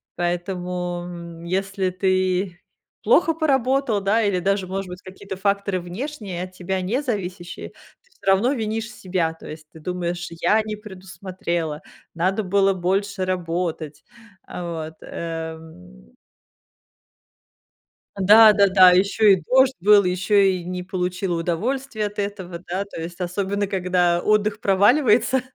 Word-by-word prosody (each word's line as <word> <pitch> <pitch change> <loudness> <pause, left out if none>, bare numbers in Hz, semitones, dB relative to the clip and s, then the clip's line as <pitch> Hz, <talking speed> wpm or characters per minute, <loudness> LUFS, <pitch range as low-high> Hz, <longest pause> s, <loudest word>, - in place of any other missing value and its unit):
Поэтому, 175 0 -3
м, 170 -1 -9
если 190 +1 -1
ты 185 -1 0 0.4
плохо 335 -2 +4
поработал, 270 - +1
да, 210 +4 +2
или 200 -3 +1
даже, 195 0 0
может 195 0 -4
быть, 180 0 -9
какие-то 190 +1 -9
факторы 200 -1 0
внешние, 190 - -6
от 185 - -8
тебя 185 +1 -3
не 230 +10 -1
зависящие, 185 -8 -5 0.3
ты 485 - -33
всё - - -21
равно 220 +8 +3
винишь 225 -1 -3
себя. 180 -6 -2
То 165 - -13
есть, 155 0 -10
ты 160 - -14
думаешь: 175 +1 -3
"Я 215 +6 +3
не 215 0 -4
предусмотрела, 185 -5 -5 0.3
надо 190 +5 0
было 195 +1 +2
больше 190 +2 -1
работать". 165 -4 -3 0.4
А 180 - -7 0.3
вот 160 - -19
э 160 - -8 2.0
Да-да-да, 200 -2 +7
ещё 200 +4 +3
и 190 -3 +6
дождь 260 +8 +3
был, 205 +2 +6
ещё 185 +3 0
и 190 -3 +3
не 180 +1 -5
получила 180 -1 -2
удовольствие 220 +7 -2
от 205 - -12
этого, 190 -4 -4
да, 185 +3 -2
то 200 - -9
есть 170 +2 -7
особенно 195 +3 -2
когда 180 -2 +1
отдых 210 0 +1
проваливается. 240 +5 +3
185 Hz, 130 wpm, -22 LUFS, 175-205 Hz, 2.0 s, Да-да-да